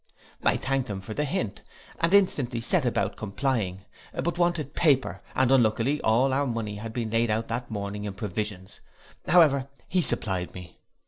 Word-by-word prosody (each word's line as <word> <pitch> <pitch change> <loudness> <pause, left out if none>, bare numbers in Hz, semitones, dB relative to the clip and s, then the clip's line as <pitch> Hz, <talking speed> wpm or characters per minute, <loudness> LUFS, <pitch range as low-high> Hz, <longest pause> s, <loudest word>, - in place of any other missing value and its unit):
I - - +3
thank'd 135 -2 -1
him 100 -2 -3
for 110 +3 -7
the 150 - -1
hint, 130 - -2 0.4
and 165 +1 +2
instantly 145 -12 +3
set 150 +6 +2
about 105 -4 0
complying; 100 -3 -2 0.3
but 170 - -2
I - - -9
wanted 170 -5 0
paper, 130 - +2
and 130 -1 +3
unluckily 125 +3 +3
all 125 +5 +3
our 140 +1 +1
money 115 -4 -3
had 110 +1 -6
been 115 -2 -3
laid 115 0 +2
out 110 +1 -1
that 120 +2 -3
morning 105 -1 -4
in 100 -2 -5
provisions; 105 -1 -5 0.5
however 145 -6 +5 0.2
he 180 0 +2
supplied 95 - -1
me. 90 -2 -10
115 Hz, 175 wpm, -27 LUFS, 105-140 Hz, 0.5 s, however